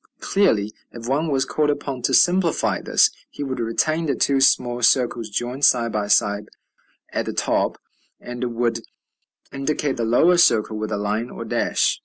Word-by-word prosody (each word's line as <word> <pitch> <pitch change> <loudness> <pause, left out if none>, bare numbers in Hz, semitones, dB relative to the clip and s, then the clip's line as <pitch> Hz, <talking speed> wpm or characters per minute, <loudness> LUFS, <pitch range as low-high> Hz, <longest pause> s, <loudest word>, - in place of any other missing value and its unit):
Clearly, 110 - +1 0.2
if 115 0 -9
one 145 +5 0
was 135 -2 0
called 150 +2 0
upon 140 -3 -3
to - - -1
simplify 175 -2 +2
this, - - +3 0.2
he - - -7
would 130 -2 -4
retain 155 +8 -1
the 140 - 0
two 135 -1 +1
small 125 -2 +2
circles 120 -2 +1
joined 120 +6 -4
side 115 -4 +3
by 105 -1 -2
side 105 0 +1 0.6
at - - -2
the - - -3
top, - - 0 0.4
and 120 -1 -5
would 115 -1 -1 0.7
indicate 140 0 -2
the 120 - -2
lower 145 +11 +3
circle 110 -9 +3
with 110 0 -4
a 105 - -1
line 105 +4 -2
or - - -8
dash. - - 0
125 Hz, 170 wpm, -21 LUFS, 115-145 Hz, 0.7 s, this